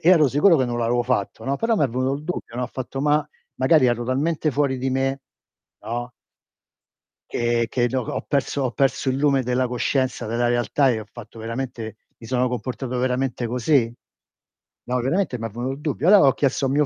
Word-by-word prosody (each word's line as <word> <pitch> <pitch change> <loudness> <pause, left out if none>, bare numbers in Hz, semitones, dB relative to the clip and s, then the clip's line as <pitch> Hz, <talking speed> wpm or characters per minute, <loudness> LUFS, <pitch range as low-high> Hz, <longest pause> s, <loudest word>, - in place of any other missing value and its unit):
ero 155 -5 +5
sicuro 160 +6 +5
che 130 - +2
non 120 -1 -2
l'avevo 120 +1 +1
fatto, 120 -5 -2
no, 135 +1 0
però 230 -1 +1
m'è 145 - +3
venuto 130 +3 -1
il 145 +2 -7
dubbio, 155 -8 -5
no, 125 - -1
ho - - -1
fatto: 130 +1 -6
"Ma, 150 +1 +2 0.3
magari 130 +1 +4
ero 120 -1 0
talmente 150 +5 0
fuori 140 -2 0
di 130 +1 -1
me" 135 +1 0 0.7
no 120 +2 -4 1.2
"che 120 0 +1
che 120 0 +1
no 130 -1 0
ho - - -6
ho - - -7
perso 140 0 -1
ho 130 - 0
perso 135 +3 0
il 130 - +1
lume 140 -1 +2
della 125 +1 0
coscienza, 125 0 -1
della 120 +2 0
realtà, 120 +3 +2
e 110 - -1
ho - - -8
fatto 115 -1 -11
veramente 115 -1 -5 0.2
mi 115 - -11
sono 125 +1 +1
comportato 125 +1 -4
veramente 125 -1 -1
così?" 125 0 +2 0.9
No, 125 +1 -1
veramente 155 +1 0
m'è 115 - -4
venuto 120 +5 -3
il 140 - -10
dubbio. 150 +2 -1
Allora 195 -7 +7
ho 135 - +5
chiesto 140 -1 0
a - - -1
mio 145 +2 +3
130 Hz, 205 wpm, -23 LUFS, 120-140 Hz, 1.2 s, Allora